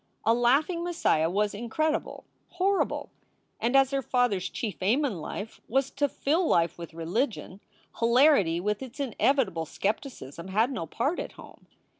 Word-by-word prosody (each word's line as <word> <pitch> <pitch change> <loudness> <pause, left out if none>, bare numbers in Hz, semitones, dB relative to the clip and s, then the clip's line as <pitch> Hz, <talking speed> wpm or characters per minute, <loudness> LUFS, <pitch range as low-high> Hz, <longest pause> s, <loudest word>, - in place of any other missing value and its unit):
A 225 - +5
laughing 280 +9 +2
Messiah 330 - +1
was 205 +3 0
incredible, 240 +9 -2 0.3
horrible. 380 +2 0 0.5
And 235 +4 0
as 270 0 +5
her 275 0 0
father 245 -5 +1
s 185 +1 -4
chief 215 -5 -5
aim 240 +11 +2
in 200 - -3
life 205 +7 -7
was 270 +2 +1
to 285 0 0
fill 320 +7 0
life 170 0 +2
with 170 -1 -9
religion, 190 - -2 0.4
hilarity 235 - +4
with 210 +4 -1
its 260 +2 -9
inevitable 245 - +1
skep 200 +7 -1
ticism 170 - -9
had 220 +7 +2
no 165 -11 -4
part 280 - -1
at - - -5
home. - - -15
235 Hz, 160 wpm, -28 LUFS, 190-275 Hz, 0.5 s, A